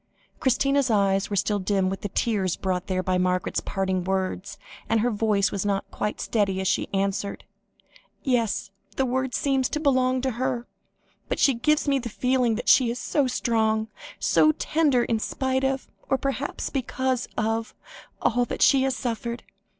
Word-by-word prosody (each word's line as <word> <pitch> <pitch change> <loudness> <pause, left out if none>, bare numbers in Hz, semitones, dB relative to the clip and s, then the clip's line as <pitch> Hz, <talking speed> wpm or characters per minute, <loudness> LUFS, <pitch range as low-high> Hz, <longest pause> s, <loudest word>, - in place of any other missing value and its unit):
Christina's 275 +1 +2
eyes 195 -2 +2
were 205 - -2
still 205 +2 +1
dim 190 0 +1
with 195 +1 -3
the 205 - -3
tears 195 -4 0
brought 185 -1 -2
there 185 -1 -1
by 185 0 +1
Margaret's 180 0 0
parting 190 -2 -1
words, 190 +1 -2 0.3
and 225 -1 +3
her 245 +2 +1
voice 210 -2 +1
was 195 - -2
not 200 -1 -1
quite 210 - -3
steady, 200 -4 0
as 190 - -1
she 195 - 0
answered 200 +1 -2 0.8
"Yes; 230 -6 0 0.2
the 265 - +1
word 260 0 -1
seems 270 -2 +1
to 300 - -2
belong 260 -3 +2
to 265 0 0
her, 255 -2 -1 0.6
but - - -1
she 275 - +4
gives 300 +6 +1
me 275 -1 +3
the 235 -2 -5
feeling 250 0 +1
that 230 - -5
she 255 -3 +6
is 235 - -3
so 280 +1 0
strong, 220 -3 0 0.3
so 310 - +4
tender, 295 -6 +2
in 225 -2 0
spite 260 +3 -1
of, 270 0 -1 0.2
or 270 - +3
perhaps 275 +1 -3
because 260 -1 -1
of, 225 +1 -1 0.5
all 245 +1 +3
that - - -1
she 270 -2 +5
has 265 -1 +1
suffered. 235 0 -4
230 Hz, 175 wpm, -25 LUFS, 200-260 Hz, 0.8 s, she